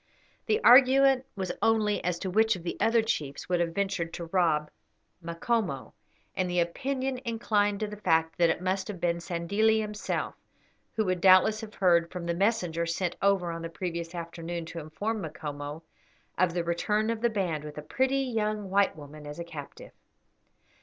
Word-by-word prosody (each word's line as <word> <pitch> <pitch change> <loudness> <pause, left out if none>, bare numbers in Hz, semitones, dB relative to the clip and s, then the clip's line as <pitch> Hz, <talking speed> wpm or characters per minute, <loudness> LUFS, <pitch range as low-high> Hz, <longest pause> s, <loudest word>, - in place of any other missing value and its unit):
The 435 - +2
argument 265 +1 +6
was 190 -2 -3
only 215 -2 +2
as 175 -1 0
to 185 +1 -4
which 220 +2 +3
of 175 - -9
the 170 - -3
other 230 0 +3
chiefs 145 -10 -3
would 180 -1 +1
have 170 -1 -1
ventured 195 -4 -1
to 170 - -5
rob 165 -4 +1 0.5
Macomo, 170 - -2 0.4
and 185 -1 0
the 180 0 +1
opinion 260 +9 -1
inclined 210 -4 0
to 215 - 0
the 210 0 -8
fact 160 -3 +1
that 170 -1 +5
it 170 - -1
must 190 +1 -1
have 200 -4 -6
been 170 -1 +1
Sandilli 200 +6 +1
himself, 210 -1 -3 0.6
who 220 - +1
would 185 -2 -1
doubtless 190 +4 +6
have 215 -1 -9
heard, 170 -3 +3
from 180 -2 -5
the 170 - 0
messenger 175 -4 0
sent 175 +1 -1
over 195 -3 +2
on 165 0 -5
the 165 - -5
previous 170 0 -5
afternoon 170 0 -5
to 165 - -7
inform 205 +8 -3
Macomo, 150 -1 -6 0.5
of 180 -2 +1
the 175 - 0
return 210 +6 0
of 225 -1 -4
the 235 - +3
band 180 -8 -2
with 150 0 -9
a 150 - -5
pretty 260 - +1
young 215 -5 -2
white 200 0 +3
woman 150 0 -11
as 145 - -7
a 170 - -4
captive. 155 -4 -10
185 Hz, 180 wpm, -28 LUFS, 170-215 Hz, 0.6 s, argument